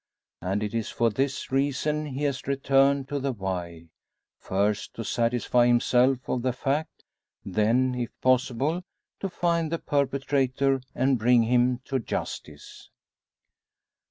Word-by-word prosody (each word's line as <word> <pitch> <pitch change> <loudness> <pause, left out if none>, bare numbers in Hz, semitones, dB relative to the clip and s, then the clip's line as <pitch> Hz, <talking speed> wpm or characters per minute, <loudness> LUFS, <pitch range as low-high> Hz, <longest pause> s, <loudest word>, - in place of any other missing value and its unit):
And 95 +3 -1
it 105 - -3
is 115 -2 -2
for 115 -1 +1
this 135 +4 -2
reason 145 +3 0
he 140 +1 -4
has 140 -3 -2
returned 135 0 +2
to 145 - -2
the 135 0 -1
Wye, 90 -6 -5 0.5
first 100 +2 -1
to 115 - -4
satisfy 120 +1 +2
himself 125 +2 +3
of 125 - -1
the 130 0 0
fact; 140 +4 -2 0.4
then, 115 +6 +2
if 125 -2 -3
possible, 130 +6 +1 0.4
to 195 - -3
find 170 -2 0
the 165 - 0
perpetrator, 135 -2 0
and 130 -1 +2
bring 120 +1 +4
him 125 +1 +2
to 135 - -1
justice. 115 - -6
130 Hz, 130 wpm, -26 LUFS, 115-140 Hz, 0.5 s, bring